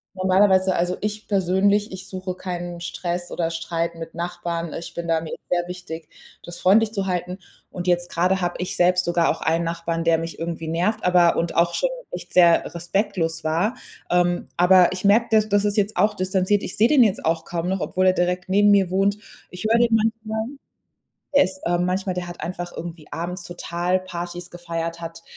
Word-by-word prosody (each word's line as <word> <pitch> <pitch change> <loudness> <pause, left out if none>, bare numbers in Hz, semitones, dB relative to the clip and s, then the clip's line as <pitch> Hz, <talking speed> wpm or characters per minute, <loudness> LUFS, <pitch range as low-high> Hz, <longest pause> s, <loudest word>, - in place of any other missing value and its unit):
normalerweise 190 0 +3
also, 180 +1 0
ich 210 0 -4
persönlich, 200 +2 +2
ich 185 0 -8
suche 185 -1 -5
keinen 175 -2 -5
Stress 175 0 -4
oder 165 -1 -1
Streit 165 0 -3
mit 165 0 -8
Nachbarn. 170 -1 -4
Ich 170 - -7
bin 170 0 -5
da 165 -1 +1
mir 160 - -6
ist - - -7
sehr 175 0 0
wichtig, 170 -3 -8 0.3
das 175 0 -9
freundlich 215 +4 +4
zu 195 -2 -2
halten. 180 0 -2 0.3
Und 180 0 -6
jetzt 175 0 +1
grade 185 +2 +1
habe 175 0 -1
ich 180 - -3
selbst 180 0 +3
sogar 170 -1 +2
auch - - -2
einen 165 +1 +1
Nachbarn, 165 0 -2
der 165 -1 +3
mich 165 +1 -6
irgendwie 165 -1 -4
nervt, 185 +7 0
aber 180 -2 +4
und 170 0 -1
auch 170 0 +3
schon - - +1 0.2
echt - - -8
sehr 170 -2 +5
respektlos 170 -2 -1
war. 170 +9 0 0.3
Ähm, 175 0 +1
aber 180 0 +6
ich 185 +2 -4
merke, 225 +4 +5
da 220 - +6
das 205 -1 +2
ist 205 +1 0
jetzt 205 +1 +1
auch 210 +3 +2
distanziert. 190 +1 +1
Ich - - -5
sehe 225 +3 +5
den 285 -4 +6
jetzt 210 -4 0
auch 165 0 0
kaum 175 0 -3
noch, 190 0 -1
obwohl 185 +2 0
er 185 - +5
direkt 180 0 -1
neben 205 +2 +5
mir 195 -3 +4
wohnt. 195 +2 +1 0.3
Ich 180 +4 -7
höre 230 - +5
den 235 -1 +3
manchmal, 220 0 -1 1.0
der 280 - +7
ist 190 0 -6
äh, 175 0 +1
manchmal, 185 +1 -1
der 180 - -3
hat 175 0 -9
einfach 175 +1 -5
irgendwie 165 -2 -7
abends 175 +2 -4
total 175 +1 -2
Partys 175 -1 -7
gefeiert, 170 -1 -5
hat 165 0 -8
180 Hz, 200 wpm, -23 LUFS, 170-190 Hz, 1.0 s, der